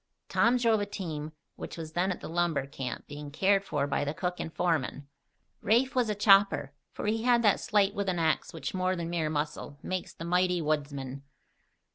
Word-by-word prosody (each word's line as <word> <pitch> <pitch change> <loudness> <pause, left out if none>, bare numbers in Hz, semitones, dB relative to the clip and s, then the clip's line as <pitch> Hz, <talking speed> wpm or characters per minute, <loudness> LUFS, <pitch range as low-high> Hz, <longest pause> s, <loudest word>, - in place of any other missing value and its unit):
Tom 245 +2 +4
drove 230 -3 +3
a 205 - -2
team 160 -7 -5 0.3
which - - -7
was 160 -1 -6
then 180 +3 +1
at 180 - -5
the - - -6
lumber 165 -4 0
camp, 135 -2 -6
being 145 0 -8
cared 195 +6 +2
for 145 -7 -1
by 145 - 0
the 145 +2 -3
cook 180 +1 -2
and 160 - -4
foreman; 155 -5 -1 0.5
Rafe 240 +5 +3
was 250 -4 +1
a 210 - 0
chopper, 195 -8 +4 0.2
for - - -6
he 220 +1 +1
had 240 0 +3
that 210 - +4
sleight 205 -2 +2
with 200 -1 -1
an 180 - 0
ax 160 -2 +1
which, 165 - -5
more 185 0 0
than 170 -1 -4
mere 165 -3 0
muscle, 150 -1 -3
makes 185 -1 -3
the 165 - -7
mighty 180 +1 +2
woodsman. 140 -3 -2
175 Hz, 200 wpm, -29 LUFS, 150-200 Hz, 0.5 s, Tom